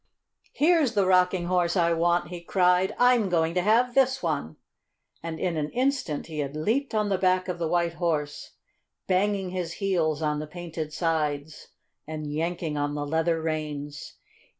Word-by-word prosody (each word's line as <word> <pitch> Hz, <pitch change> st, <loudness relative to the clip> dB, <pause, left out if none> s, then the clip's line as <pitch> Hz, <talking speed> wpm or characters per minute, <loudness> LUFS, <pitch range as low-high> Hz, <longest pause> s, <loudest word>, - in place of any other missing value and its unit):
"Here's 310 Hz, -6 st, +3 dB
the 200 Hz, -2 st, +3 dB
Rocking 180 Hz, -1 st, +3 dB
Horse 180 Hz, 0 st, +1 dB
I 170 Hz, -1 st, +3 dB
want!" 170 Hz, +1 st, +1 dB
he 175 Hz, -1 st, -7 dB
cried. 180 Hz, +2 st, +2 dB
"I'm 245 Hz, -5 st, +4 dB
going 165 Hz, -2 st, +1 dB
to 180 Hz, -, +1 dB
have 235 Hz, +6 st, +3 dB
this 265 Hz, -2 st, +2 dB
one!" 145 Hz, -, -2 dB, 0.7 s
And 165 Hz, -1 st, -5 dB
in 175 Hz, -3 st, -1 dB
an 150 Hz, -1 st, -1 dB
instant 255 Hz, -, -1 dB
he 155 Hz, -2 st, -6 dB
had 140 Hz, 0 st, -3 dB
leaped 225 Hz, -, -1 dB
on 210 Hz, -1 st, +1 dB
the 195 Hz, -2 st, 0 dB
back 185 Hz, -1 st, +2 dB
of 180 Hz, -1 st, -4 dB
the 165 Hz, -, -1 dB
White 170 Hz, 0 st, +1 dB
Horse, 155 Hz, -4 st, -2 dB, 0.5 s
banging 195 Hz, 0 st, 0 dB
his 180 Hz, -2 st, -3 dB
heels 165 Hz, -6 st, 0 dB
on 150 Hz, -1 st, 0 dB
the 155 Hz, -, -5 dB
painted 160 Hz, -1 st, -6 dB
sides 155 Hz, -2 st, -2 dB, 0.4 s
and 155 Hz, -1 st, -5 dB
yanking 165 Hz, -1 st, -2 dB
on 145 Hz, 0 st, -1 dB
the 145 Hz, 0 st, -3 dB
leather 160 Hz, +2 st, 0 dB
reins. 150 Hz, -2 st, -4 dB
170 Hz, 170 wpm, -26 LUFS, 155-190 Hz, 0.7 s, I'm